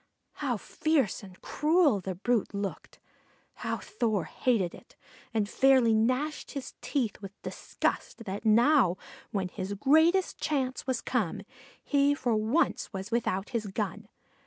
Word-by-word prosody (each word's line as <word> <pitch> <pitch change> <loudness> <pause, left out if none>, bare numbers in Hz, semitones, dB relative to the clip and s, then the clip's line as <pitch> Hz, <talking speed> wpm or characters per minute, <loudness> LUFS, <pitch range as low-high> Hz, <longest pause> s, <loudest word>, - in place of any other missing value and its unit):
How - - -1
fierce 310 - 0
and 190 -3 -13
cruel 300 - +3
the 185 0 -4
brute 215 +2 0
looked! 200 -1 -5 0.6
How - - -1
Thor 220 - -1
hated 205 -7 0
it! - - -15 0.4
and 215 -2 0
fairly 260 -1 +4
gnashed 255 +8 0
his 275 -3 -6
teeth 235 -8 -2
with 195 0 -10
disgust 230 - -3
that 195 +1 -4
now, 230 - +4 0.3
when 190 -3 -2
his 190 +1 -4
greatest 320 - +3
chance 265 -4 -1
was 255 -2 0
come, 210 -9 -1 0.4
he 285 0 +3
for 245 -5 0
once 220 +10 +1
was 195 +1 -6
without 210 -4 0
his 225 -4 -2
gun. 205 +1 -4
230 Hz, 135 wpm, -29 LUFS, 200-275 Hz, 0.6 s, fairly